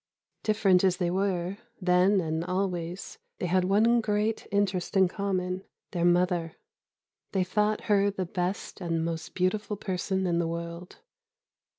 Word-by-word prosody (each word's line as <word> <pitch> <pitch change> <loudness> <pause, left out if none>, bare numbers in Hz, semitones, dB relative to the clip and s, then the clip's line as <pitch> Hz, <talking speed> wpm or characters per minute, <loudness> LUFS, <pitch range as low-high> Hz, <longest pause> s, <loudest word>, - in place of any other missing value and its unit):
Different 195 -4 +3
as 185 -2 +3
they 175 -2 0
were, 190 0 -1 0.2
then 185 +1 +4
and 160 0 -2
always, 180 -1 -3 0.2
they - - -3
had 180 +1 +2
one 225 +5 +4
great 215 0 0
interest 195 -1 0
in 190 -1 +6
common: 185 -1 -2 0.3
their 175 -1 0
mother. 175 -1 +2 0.8
They 190 -2 +2
thought 210 +3 +1
her 205 -1 +3
the 195 -2 -3
best 180 +3 -3
and 165 -2 -1
most 165 -1 -4
beautiful 205 +3 0
person 190 0 -2
in 170 -1 +1
the 170 - 0
world. 170 +1 -6
185 Hz, 145 wpm, -28 LUFS, 175-200 Hz, 0.8 s, in